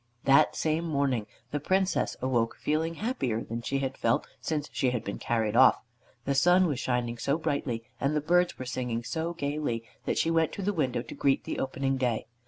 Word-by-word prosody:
That 140 +3 +5
same 160 +1 0
morning 140 -8 0 0.2
the 145 - -1
Princess 190 +5 +1
awoke 120 -3 +1
feeling 160 +2 -1
happier 135 - -1
than 115 +1 -5
she 135 +3 -1
had 135 -1 -2
felt 115 - +1
since 150 -2 -2
she 130 - +1
had 125 -2 -2
been 100 - -5
carried 115 -2 0
off. 130 +1 +7 0.5
The 140 - +1
sun 175 +6 +5
was 145 -7 -1
shining 120 -3 -1
so 140 +6 +1
brightly, 140 -7 -2 0.2
and 140 +2 0
the - - +3
birds 175 +4 +2
were 130 - -6
singing 125 -2 -3
so 165 +6 -3
gaily, 145 -6 -2 0.2
that - - 0
she 165 - +2
went 165 -1 +2
to 200 - -5
the 205 +2 +1
window 130 -8 0
to - - -9
greet 135 -1 +1
the - - -4
opening 135 0 -1
day. 125 -4 0
140 Hz, 200 wpm, -28 LUFS, 120-160 Hz, 0.5 s, off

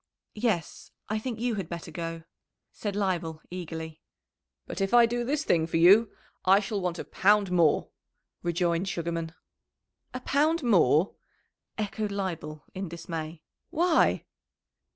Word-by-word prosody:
"Yes, 210 -7 -2 0.2
I 215 +1 0
think 230 -1 -4
you 240 0 0
had 170 - -10
better 170 -1 -6
go," 165 0 -5 0.5
said 205 -2 -4
Leibel 175 -6 -1
eagerly. 160 -3 -6 0.6
"But - - -5
if 195 +4 +2
I 240 -1 +8
do 240 +1 -1
this 290 +5 -1
thing 165 - +2
for 165 - 0
you 200 +7 +6 0.3
I 190 +2 +6
shall 205 0 -3
want 180 -1 -2
a - - -5
pound 205 -1 +3
more," 170 -4 +3 0.5
rejoined 175 +1 0
Sugarman. 165 -2 -3 0.8
"A 255 - -5
pound 305 +5 +2
more!" 180 - +4 0.6
echoed 210 0 -2
Leibel, 165 -6 -4
in 190 -2 -4
dismay. 165 -1 -6 0.3
"Why?" 340 0 +2
185 Hz, 135 wpm, -28 LUFS, 165-215 Hz, 0.8 s, I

